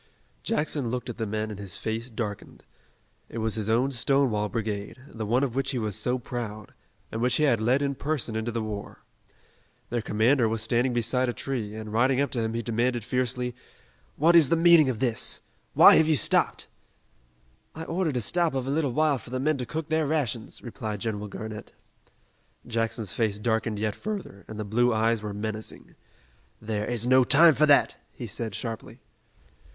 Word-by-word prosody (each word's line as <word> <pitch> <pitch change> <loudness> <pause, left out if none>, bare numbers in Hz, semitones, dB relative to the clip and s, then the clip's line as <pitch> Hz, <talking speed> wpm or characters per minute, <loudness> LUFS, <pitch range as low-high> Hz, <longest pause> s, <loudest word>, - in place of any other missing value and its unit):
Jackson 150 - -1
looked 125 0 -3
at - - -11
the 110 - -1
men 110 +1 -3
and 100 - -8
his 100 -3 -7
face 115 +2 -3
darkened. 110 -3 -6 0.7
It - - -8
was 110 -1 0
his 110 -1 -2
own 125 +5 +2
Stonewall 125 -4 +1
Brigade, 105 -2 -4
the 110 -2 -6
one 125 +5 +2
of 130 -4 -1
which 135 +1 -1
he 135 - -1
was 110 -4 -2
so 125 +1 0
proud, 115 -4 -6 0.4
and 110 - -4
which 125 +1 +2
he 155 - +2
had 120 -7 +3
led 130 +5 +2
in 140 0 0
person 140 -5 -2
into 110 +2 -2
the 115 -1 -2
war. 105 -2 -7 0.9
Their 120 -1 0
commander 115 +3 +2
was 110 0 -1
standing 120 +3 +1
beside 120 +2 +1
a - - -1
tree, 115 -7 -4
and 110 -1 -7
riding 130 +3 +3
up 140 -2 0
to 120 - -1
him 110 0 -2
he 115 - -2
demanded 120 +1 0
fiercely: 125 +1 -1 0.6
"What 165 +4 +4
is 160 -6 +6
the - - +4
meaning 165 -3 +6
of 125 - -2
this? 120 -1 0 0.3
Why - - +9
have 160 - +4
you 160 - +3
stopped?" 120 - +2 1.1
"I 160 - -6
ordered 165 -4 -1
a - - 0
stop 170 - +2
of 130 -1 -1
a 135 - -2
little 145 -4 0
while 150 -2 +2
for 115 - -14
the 130 +1 -3
men 150 +2 +1
to 125 - -4
cook 155 +4 -4
their 160 -1 +1
rations," 135 -7 -2
replied 110 -4 -5
General 105 -2 -3
Garnett. 110 +1 -8 0.9
Jackson's 115 -4 -2
face 110 -3 0
darkened 110 0 -1
yet 105 0 -1
further, 200 - -6
and 110 -1 -8
the 105 - -3
blue 120 +4 +2
eyes 115 0 +1
were 105 -1 -5
menacing. 110 +1 -6 0.7
"There 105 -1 -3
is 120 -2 0
no 130 +1 +5
time 155 +6 +7
for 150 +3 +3
that," 145 - +4
he 125 - -8
said 110 -1 -4
sharply. 115 -2 -6
120 Hz, 195 wpm, -26 LUFS, 110-135 Hz, 1.1 s, Why